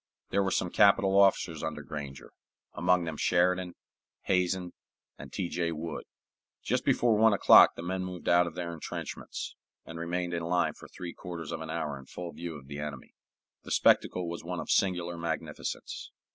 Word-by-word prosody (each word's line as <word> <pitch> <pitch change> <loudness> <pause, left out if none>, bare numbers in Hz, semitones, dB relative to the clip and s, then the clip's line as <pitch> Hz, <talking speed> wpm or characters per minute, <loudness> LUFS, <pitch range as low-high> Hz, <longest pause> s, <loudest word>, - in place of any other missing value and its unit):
There 100 - +3
were 95 - +1
some 90 -1 0
capital 100 -1 +5
officers 100 -1 +3
under - - -4
Granger, 70 -3 -7 0.4
among 90 0 +2
them 80 -2 -4
Sheridan, 90 +1 +2 0.5
Hazen, 90 -1 0 0.5
and - - -9
T. 90 - -2
J. 85 -1 -1
Wood. 80 0 -5 0.6
Just - - 0
before 120 -2 +3
one 110 0 +5
o'clock 100 - +8
the 85 - -7
men 95 +1 -2
moved 90 -1 -7
out 85 0 +5
of 85 - -7
their 85 -1 -4
intrenchments, 80 - -6 0.3
and 80 0 -8
remained 85 +1 -2
in 85 - -1
line 85 +1 +1
for - - -13
three 85 -2 -8
quarters 85 -4 -7
of 80 -1 -4
an 80 - -6
hour 75 -4 -3
in 65 - -14
full 90 -1 -7
view 85 -1 -6
of 70 -2 -11
the 70 +1 -7
enemy. 75 -3 -7 0.5
The - - -12
spectacle 90 -1 +3
was 85 0 -5
one 90 0 -4
of - - -3
singular 90 -3 +1
magnificence. 85 -1 -4
85 Hz, 180 wpm, -30 LUFS, 80-90 Hz, 0.6 s, o'clock